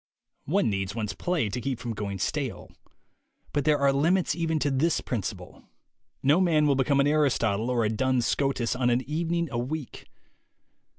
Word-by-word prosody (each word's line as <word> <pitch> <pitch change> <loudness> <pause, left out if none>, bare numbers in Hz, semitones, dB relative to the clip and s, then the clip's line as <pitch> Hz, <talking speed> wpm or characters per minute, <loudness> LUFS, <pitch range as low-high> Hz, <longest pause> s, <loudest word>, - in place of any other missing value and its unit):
One 195 +8 +2
needs 100 +1 -3
one's 110 -3 -3
play 175 -10 -1
to 120 +5 -4
keep 135 0 -2
from 115 -1 -5
going 100 -2 -4
stale. - - -3 0.8
But 145 0 0
there 150 -1 +4
are 140 -1 +3
limits 165 +6 +2
even 165 -2 -1
to 145 -1 0
this 150 +5 +1
principle. 115 -7 -5 0.6
No 145 +7 +4
man 160 -4 +3
will 145 - +4
become 135 +1 +2
an 140 - +4
Aristotle 125 -7 +1
or 120 -3 +1
a - - +1
Duns 125 +2 +1
Scotus 135 -4 0
on 125 -1 +1
an 125 +2 0
evening 170 +2 -1
a 120 - -2
week. 140 +2 -5
135 Hz, 175 wpm, -27 LUFS, 120-155 Hz, 0.8 s, there